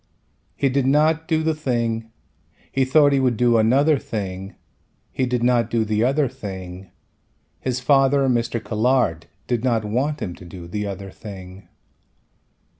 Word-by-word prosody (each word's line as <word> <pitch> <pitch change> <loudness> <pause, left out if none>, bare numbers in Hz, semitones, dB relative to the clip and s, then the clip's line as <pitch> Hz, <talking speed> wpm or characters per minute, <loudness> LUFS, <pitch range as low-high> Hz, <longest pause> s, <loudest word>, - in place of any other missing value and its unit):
He 140 - +1
did 135 0 +1
not 155 +3 +2
do 160 -1 +1
the 160 0 +1
thing, 115 -6 -2 0.6
he 135 -1 +1
thought 145 +1 +4
he 135 - +3
would 125 -4 +1
do 120 -1 +4
another 135 +6 +3
thing, 95 -4 -5 0.6
he 130 - -1
did 125 -1 -1
not 120 -2 +2
do 115 -2 +1
the 110 +1 0
other 135 +3 +2
thing, 95 -4 -8 0.7
his 130 -1 -2
father 135 +1 +3
Mr. 120 -1 0
Colhard 110 - 0 0.2
did 120 -2 -1
not 115 -4 +1
want 130 +8 -1
him 90 - -4
to 90 - -13
do 85 -1 -10
the 105 +4 -3
other 100 0 -6
thing. 95 -2 -11
120 Hz, 155 wpm, -22 LUFS, 105-135 Hz, 0.7 s, thought